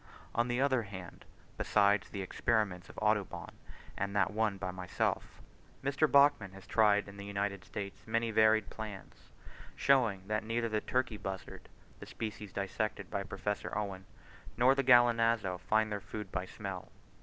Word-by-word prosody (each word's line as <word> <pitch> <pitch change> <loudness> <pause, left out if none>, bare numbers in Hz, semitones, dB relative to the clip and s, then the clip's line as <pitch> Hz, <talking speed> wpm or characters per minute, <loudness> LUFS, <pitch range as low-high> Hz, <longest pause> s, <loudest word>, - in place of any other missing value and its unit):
On 120 +1 +1
the 120 0 0
other 130 -2 +3
hand, 95 -4 -9 0.3
besides 100 0 +3
the 100 -2 -4
experiments 100 -3 0
of - - -14
Audubon - - 0 0.4
and 100 +1 -3
that 95 -1 +3
one 110 -2 +1
by 90 -1 -3
myself, 90 -1 -2 0.4
Mr. 140 +3 +2
Bachman 140 -9 +5
has 95 0 -12
tried 105 -2 +3
in 100 0 -11
the 100 - -7
United 100 -1 -2
States 100 -1 -7
many 115 +1 0
varied 110 -1 +4
plans, 105 -3 -9 0.5
showing 115 -9 +3
that 110 +1 -1
neither 115 +1 -1
the 110 -1 0
turkey 125 -4 -1
buzzard 95 -2 -7 0.3
(the - - -9
species 105 -2 -6
dissected 100 0 -3
by 100 - -1
Professor 105 +1 -3
Owen) 95 -3 -4 0.5
nor 125 +3 +6
the 135 0 0
gallinazo 115 -6 +4
find 110 +2 +1
their 105 -1 -2
food 105 0 -7
by 90 0 -2
smell. 95 -1 -7
105 Hz, 155 wpm, -33 LUFS, 100-115 Hz, 0.5 s, nor